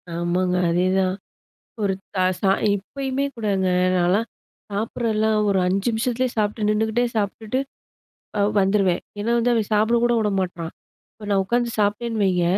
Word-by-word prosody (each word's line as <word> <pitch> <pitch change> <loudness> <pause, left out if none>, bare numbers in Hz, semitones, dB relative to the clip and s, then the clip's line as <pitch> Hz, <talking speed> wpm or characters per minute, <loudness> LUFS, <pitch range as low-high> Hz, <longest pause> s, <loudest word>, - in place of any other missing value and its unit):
ஆமாங்க. 180 +1 0
அதேதான். 185 +2 +1 0.7
ஒரு 195 -1 +2 0.2
த - - -3 0.2
ச - - -19 0.3
இப்பயுமே 270 +7 -3
கூடங்க 200 -4 0 0.3
நான்லாம் 185 +6 +2 0.4
சாப்பிடுறதெல்லாம் 220 0 0
ஒரு 195 -1 +2
5 195 +4 0
நிமிஷத்துலேயே 245 +2 0
சாப்பிட்டு 210 0 0
நின்னுகிட்டே 220 +3 +1
சாப்பிட்டுட்டு 215 +4 -1 0.8
அ - - +3 0.2
வந்துருவேன். 195 -2 +2 0.2
ஏன்னா 225 +3 -1
வந்து 240 +1 +2
அவன் 220 -3 0
சாப்பிட 220 +3 +3
கூட 240 0 +3
விட 215 -1 +1
மாட்றான். 175 -3 -3 0.4
இப்ப 210 -1 -11
நான் 195 -1 +3
உட்காந்து 240 +2 +1
சாப்பிட்டேன்னு 215 +2 0
வைங்க, 180 -2 +2
210 Hz, 140 wpm, -22 LUFS, 190-230 Hz, 0.8 s, அ